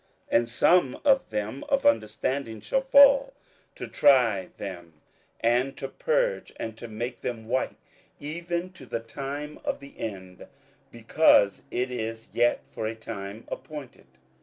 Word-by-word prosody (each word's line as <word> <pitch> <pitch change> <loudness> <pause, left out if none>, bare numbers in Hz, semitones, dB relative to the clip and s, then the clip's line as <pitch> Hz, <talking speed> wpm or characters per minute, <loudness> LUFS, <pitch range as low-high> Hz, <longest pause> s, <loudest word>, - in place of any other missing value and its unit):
27:011:035 - - +6
And 120 0 -4
some 135 +3 +3
of 270 -2 +4
them 105 +4 -3
of 275 0 +1
understanding 115 - 0
shall 265 - 0
fall, 280 - +6 0.4
to - - -6
try 115 -9 +4
them, 85 -5 -8 0.5
and 120 +4 +1
to 135 - -4
purge, - - 0
and 110 -1 -4
to 120 - -9
make 120 +3 -5
them 115 -3 -5
white, 130 - -1 0.4
even 170 +4 -4
to 145 -9 -13
the 115 - -2
time 140 +6 -6
of - - -2
the 140 0 -13
end: 95 -4 -7 0.4
because 115 -3 +4
it 125 +1 -2
is 115 -2 -5
yet 120 0 +2
for 110 - -5
a 115 - -4
time 110 -1 -7
appointed. 135 - -8
125 Hz, 145 wpm, -27 LUFS, 110-150 Hz, 0.5 s, 27:011:035